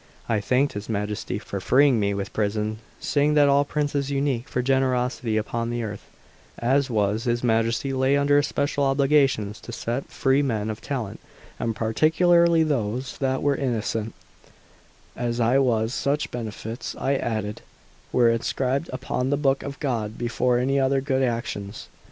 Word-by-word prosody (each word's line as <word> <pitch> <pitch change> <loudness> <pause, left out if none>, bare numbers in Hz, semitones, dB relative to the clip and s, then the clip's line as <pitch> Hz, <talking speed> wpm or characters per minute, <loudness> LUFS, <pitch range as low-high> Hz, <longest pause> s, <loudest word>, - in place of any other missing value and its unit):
I 115 -3 +1
thanked 130 +7 +1
his 105 +2 -6
Majesty 105 -1 -2
for 100 -1 -5
freeing 130 +4 +4
me 100 -1 +1
from 100 0 -2
prison, 105 +1 -1 0.2
saying 145 +1 +1
that 145 -1 +6
all 140 0 +4
princes 145 -1 -1
unique 135 -3 -1
for 125 - -1
generosity 125 -3 +1
upon 115 +2 -2
this 120 0 -2
earth, 105 -2 -7 0.5
as 135 +3 +1
was 105 -1 0
his 120 0 0
Majesty, 115 +3 +1
lay 130 +1 +2
under 145 0 +4
special 145 0 -1
obligations 135 -6 +2
to 120 - -9
set 120 +3 -3
free 135 +1 +2
men 110 -6 -1
of 110 - -8
talent, 125 -8 -4 0.4
and 115 -1 -1
particularly 165 +8 +3
those 130 -3 -2
that 130 -1 0
were 145 -1 +2
innocent, 115 -4 -2 1.0
as 120 0 -2
I 120 +3 +3
was; 115 -3 +1
such 140 +3 -1
benefits, 115 0 -5
I 135 - 0
added, 110 -5 -2 0.5
were 120 -2 +4
inscribed 130 +5 -1
upon 130 0 -2
the 145 - +1
book 135 -2 +1
of 140 0 -7
God 115 -7 -2
before 120 +1 +1
any 135 +3 +1
other 135 0 +2
good 135 0 0
actions. 115 -4 -3
125 Hz, 155 wpm, -24 LUFS, 110-140 Hz, 1.0 s, that